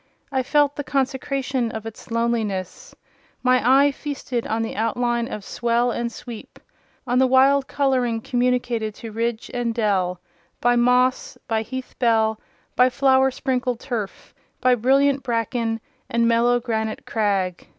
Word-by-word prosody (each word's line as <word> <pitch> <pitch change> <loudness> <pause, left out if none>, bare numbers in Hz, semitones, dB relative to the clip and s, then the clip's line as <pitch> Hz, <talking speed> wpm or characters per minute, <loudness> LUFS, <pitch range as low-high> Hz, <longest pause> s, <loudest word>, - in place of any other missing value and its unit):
I 265 -1 +1
felt 290 +2 +2
the 290 - -2
consecration 265 -2 -1
of 220 -1 -6
its 225 -1 -9
loneliness: 230 - -2 0.5
my 255 0 +4
eye 270 +4 +5
feasted 275 -4 -4
on 225 +1 -1
the 225 - -5
outline 235 +2 -1
of 210 - -5
swell 240 +1 0
and 235 0 -2
sweep—on 245 +1 -7
the 260 - +5
wild 265 +1 +4
colouring 255 -5 +1
communicated 245 -3 -1
to 225 - -8
ridge 230 +1 -3
and 240 -2 -1
dell 190 -5 0 0.4
by 245 0 +3
moss, 250 +1 +2
by 220 -1 0
heath 260 +3 -7
bell, 220 -3 +2 0.3
by 250 +1 +5
flower 265 0 +3
sprinkled 255 -2 -2
turf, 230 -7 -5 0.3
by 255 -1 +4
brilliant 270 +3 +3
bracken, 230 -2 -1 0.3
and 235 0 +2
mellow 235 +1 +3
granite 220 -3 -3
crag. 195 -5 -1
240 Hz, 140 wpm, -22 LUFS, 225-260 Hz, 0.5 s, eye